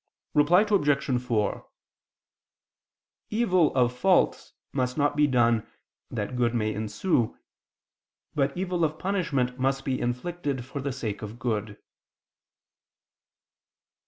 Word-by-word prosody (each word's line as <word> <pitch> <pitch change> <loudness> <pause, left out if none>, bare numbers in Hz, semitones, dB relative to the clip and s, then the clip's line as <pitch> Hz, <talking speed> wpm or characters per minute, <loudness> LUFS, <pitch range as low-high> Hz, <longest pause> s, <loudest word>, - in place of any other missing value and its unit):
Reply 160 +6 +5
Obj. 145 - +2
4: 110 -5 -1 1.6
Evil 185 - +2
of 125 -1 +2
fault 185 +7 +2 0.2
must 125 -1 -1
not 145 0 +2
be 150 0 +4
done, 120 -4 +2 0.4
that 105 +5 -4
good 120 -1 +1
may 110 -2 0
ensue; 110 - 0 1.0
but 140 +1 0
evil 180 -2 -1
of 155 -1 0
punishment 145 -10 -1
must 135 +1 0
be 130 -2 -1
inflicted 135 +1 -2
for 135 +2 -6
the 140 +1 -2
sake 115 -6 -4
of 110 +2 -7
good. 110 -4 -2
130 Hz, 110 wpm, -27 LUFS, 120-155 Hz, 1.6 s, Reply